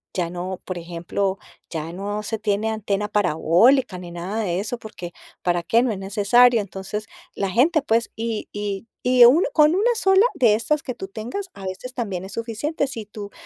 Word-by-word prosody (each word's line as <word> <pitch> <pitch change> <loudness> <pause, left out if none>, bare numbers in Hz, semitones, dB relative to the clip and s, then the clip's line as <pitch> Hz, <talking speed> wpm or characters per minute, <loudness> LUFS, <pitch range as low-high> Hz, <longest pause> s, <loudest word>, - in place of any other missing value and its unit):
ya 175 -2 -1
no, 180 +1 -5
por 185 - -4
ejemplo, 175 +3 -2 0.3
ya 160 0 -4
no 205 +3 -3
se 225 +1 -3
tiene 210 0 0
antena 210 -2 -1
parabólica 205 - +3
ni 175 -1 -9
nada 180 +6 -4
de 180 -2 -1
eso, 220 +4 -3
porque, 180 -6 -8 0.3
¿para 175 -1 +1
qué?, 230 +8 +3
no 250 - +1
es 200 - -4
necesario, 215 +4 +4
entonces, 195 +2 -6 0.3
la 195 - -1
gente, 300 - +3
pues, 230 -3 +1
y 225 -1 -3
y 205 +1 -4 0.2
y 250 -1 +7
uno 285 +10 +5
con 305 +1 +5
1 470 +5 +2
sola 385 +1 +4
de 230 -5 +4
estas 295 +7 0
que 255 - -4
tú 190 -3 -7
tengas, 245 - -6
a 195 - -10
veces 190 +7 -6
también 200 -8 -3
es 190 - -9
suficiente 240 +6 -2
si 230 -5 -6
tu 205 0 -9
210 Hz, 190 wpm, -22 LUFS, 190-245 Hz, 0.3 s, y